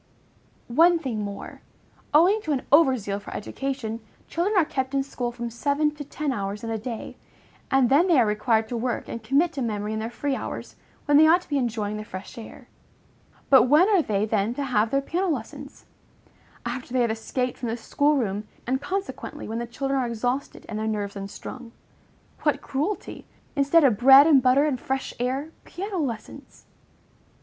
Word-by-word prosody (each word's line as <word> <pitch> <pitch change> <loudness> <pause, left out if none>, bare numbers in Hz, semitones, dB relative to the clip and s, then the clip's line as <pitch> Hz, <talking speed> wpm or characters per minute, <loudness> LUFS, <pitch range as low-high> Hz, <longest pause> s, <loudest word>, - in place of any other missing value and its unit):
One 335 +8 +5
thing 255 -9 -3
more. 200 -1 -7 0.5
Owing 360 +8 +5
to 310 -7 -1
an 265 - -2
over 280 -3 +6
zeal 200 -2 -4
for 205 - -11
education, 245 -1 -4 0.3
children 370 +6 -1
are 345 - +5
kept 265 -1 -3
in 275 - +2
school 245 -3 -4
from 235 -1 -5
seven 285 +5 0
to 295 -1 -7
ten 290 0 -3
hours 205 -2 -4
in 225 - -3
a 225 - -2
day, 230 0 -6 0.5
and 270 -2 +4
then 290 +9 +4
they 335 -7 +5
are 240 - +5
required 220 +1 +1
to 245 - -3
work 245 +1 -2
and 230 - -6
commit 280 +10 +2
to 275 - -4
memory 210 -2 -2
in 220 - -2
their 225 +1 -3
free 275 +3 -2
hours, - - -6 0.3
when 290 -1 +5
they 315 +1 +7
ought 345 +3 +5
to - - -20
be 285 -2 +1
enjoying 215 -4 -2
the 215 - -5
fresh 190 -2 -9
air. 225 - -11 0.8
But 265 - +8
when 310 +7 +6
are 395 -5 +4
they 210 -7 0
then 220 +1 0
to 285 - -2
have 230 -4 +1
their 275 +3 +1
piano 355 +7 -1
lessons? 280 0 -6 0.8
After 245 +1 -5
they 255 - +2
have 235 -2 +2
escaped 245 +3 -3
from 240 - -3
the 230 - -2
school 285 +5 +1
room, 210 -4 -2 0.2
and 265 +2 -1
consequently 390 +5 -5
when 225 +1 -3
the 235 - -4
children 270 +3 -2
are 250 - 0
exhausted 245 +4 -3
and 215 -1 -4
their 220 - -2
nerves 205 -2 -3
unstrung. 230 +4 -8 0.7
What - - +1
cruelty! 305 +10 -3 0.3
Instead 285 +3 +4
of 245 -7 +4
bread 270 +3 +9
and 295 -4 +6
butter 260 +3 +4
and 275 -5 -1
fresh 265 +1 -3
air, 265 +5 -2
piano 385 +1 -5
lessons! 235 -8 -6
255 Hz, 195 wpm, -25 LUFS, 225-290 Hz, 0.8 s, bread